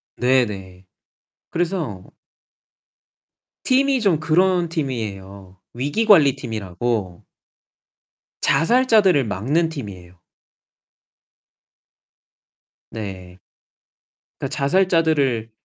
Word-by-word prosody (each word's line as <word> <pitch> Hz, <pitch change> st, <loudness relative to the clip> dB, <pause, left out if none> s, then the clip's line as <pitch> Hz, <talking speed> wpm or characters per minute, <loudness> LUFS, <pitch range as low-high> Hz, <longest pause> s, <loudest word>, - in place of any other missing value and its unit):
네네. 100 Hz, -8 st, -1 dB, 0.7 s
그래서 165 Hz, -, -3 dB, 1.5 s
팀이 270 Hz, 0 st, +2 dB
좀 190 Hz, -8 st, +2 dB
그런 175 Hz, +2 st, +2 dB
팀이에요. 100 Hz, -, -5 dB, 0.2 s
위기관리 145 Hz, -, +3 dB
팀이라고 105 Hz, -4 st, -4 dB, 1.2 s
자살자들을 215 Hz, -, +3 dB
막는 140 Hz, -, 0 dB
팀이에요. 95 Hz, -, -9 dB, 2.7 s
네. 95 Hz, -4 st, -8 dB, 1.0 s
그러니까 -, -, -4 dB
자살자들을 145 Hz, -, +1 dB
135 Hz, 165 characters per minute, -21 LUFS, -, 2.7 s, 위기관리